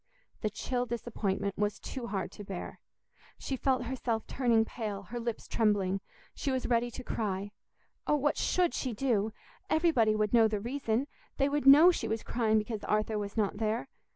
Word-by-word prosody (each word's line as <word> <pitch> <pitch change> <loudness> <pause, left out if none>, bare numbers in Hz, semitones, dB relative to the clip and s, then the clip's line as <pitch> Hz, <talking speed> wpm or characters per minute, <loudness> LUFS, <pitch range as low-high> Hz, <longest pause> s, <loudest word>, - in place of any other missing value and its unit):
The 215 - 0
chill 250 +2 -2
disappointment 205 -4 -2
was 205 -1 0
too 255 -3 -6
hard 200 -4 -3
to 205 - -9
bear. 195 -3 -6 0.6
She 270 - -3
felt 260 -1 +1
herself 235 -2 -2
turning 235 -4 +2
pale, 210 -4 -5
her 240 +6 -6
lips 235 -1 -4
trembling; 195 -3 +1 0.3
she 280 - -3
was 260 -1 -1
ready 240 0 +2
to 255 +2 -8
cry. 205 -4 -2 0.6
Oh, 300 - +4
what 295 0 +1
should 360 -2 +1
she 255 -3 -2
do? 220 -3 +1 0.4
Everybody 285 -10 +3
would 215 0 0
know 230 -2 +6
the 215 -1 -1
reason; 240 +1 -1 0.3
they 275 - +3
would 285 -1 0
know 305 +6 +10
she - - -3
was 220 +1 -2
crying 220 -2 +1
because 215 0 -2
Arthur 215 0 0
was 205 +1 -5
not 205 -2 +1
there. 220 +4 -1
225 Hz, 180 wpm, -31 LUFS, 210-255 Hz, 0.6 s, know